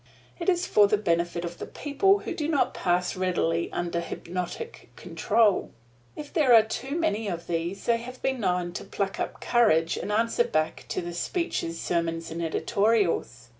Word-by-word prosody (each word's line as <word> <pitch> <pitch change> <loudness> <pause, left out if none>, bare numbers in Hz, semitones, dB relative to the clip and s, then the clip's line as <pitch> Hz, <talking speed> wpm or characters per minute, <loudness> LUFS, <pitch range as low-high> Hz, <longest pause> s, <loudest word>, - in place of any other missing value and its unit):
It 340 - 0
is 355 -1 +2
for 205 -1 +5
the 210 - +2
benefit 170 -3 0
of 170 0 -7
the - - -5
people 390 +8 +2
who - - -4
do 310 -4 -2
not 305 -3 +1
pass 180 0 0
readily 175 -2 0
under 170 -1 -2
hypnotic 180 - -6
control. 215 -4 +1 0.5
If 295 -1 -8
there 275 -7 +5
are 225 - +8
too 265 +7 -4
many 225 -10 0
of 170 -3 -4
these, 170 +3 -3
they 235 -1 +3
have 250 +2 -9
been 265 -1 0
known 180 -4 0
to - - -5
pluck 195 -1 -3
up - - -3
courage 165 -9 +3
and - - -4
answer 230 +2 +2
back 155 -8 -1
to - - -2
the 175 0 -5
speeches, 175 - -2
sermons 165 -1 -2
and 165 +1 -4
editorials. 185 - 0
195 Hz, 175 wpm, -27 LUFS, 170-240 Hz, 0.5 s, are